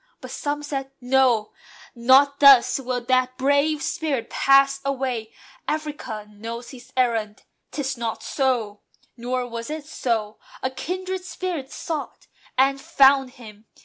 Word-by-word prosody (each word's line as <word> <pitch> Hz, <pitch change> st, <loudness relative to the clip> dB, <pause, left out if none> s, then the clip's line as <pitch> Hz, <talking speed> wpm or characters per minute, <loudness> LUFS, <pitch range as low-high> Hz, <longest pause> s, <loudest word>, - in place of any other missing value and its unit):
But -, -, -10 dB
some 290 Hz, 0 st, -3 dB
said, 270 Hz, -2 st, -4 dB
"No! 250 Hz, -4 st, +2 dB, 0.4 s
Not 265 Hz, +4 st, +4 dB
thus 275 Hz, -2 st, +7 dB
will 250 Hz, -1 st, -3 dB
that 255 Hz, +1 st, +1 dB
brave 285 Hz, +3 st, +2 dB
spirit 285 Hz, -7 st, -2 dB
pass 275 Hz, 0 st, +4 dB
away. 255 Hz, -5 st, -2 dB, 0.4 s
Africa 295 Hz, -8 st, -4 dB
knows 230 Hz, +3 st, -8 dB
his 255 Hz, -1 st, -13 dB
errand: 225 Hz, -4 st, 0 dB, 0.3 s
'tis 270 Hz, -2 st, -3 dB
not 230 Hz, -1 st, -4 dB
so." 240 Hz, -7 st, -1 dB, 0.3 s
Nor 250 Hz, +1 st, -3 dB
was 230 Hz, +1 st, -6 dB
it 305 Hz, -1 st, -5 dB
so. 225 Hz, -8 st, -2 dB, 0.2 s
A 260 Hz, -, 0 dB
kindred 370 Hz, +6 st, -4 dB
spirit 350 Hz, -7 st, -5 dB
sought, 315 Hz, -3 st, -5 dB, 0.3 s
And 275 Hz, +1 st, +3 dB
found 270 Hz, -2 st, +4 dB
him! 215 Hz, -4 st, -14 dB
260 Hz, 130 wpm, -23 LUFS, 235-280 Hz, 0.4 s, thus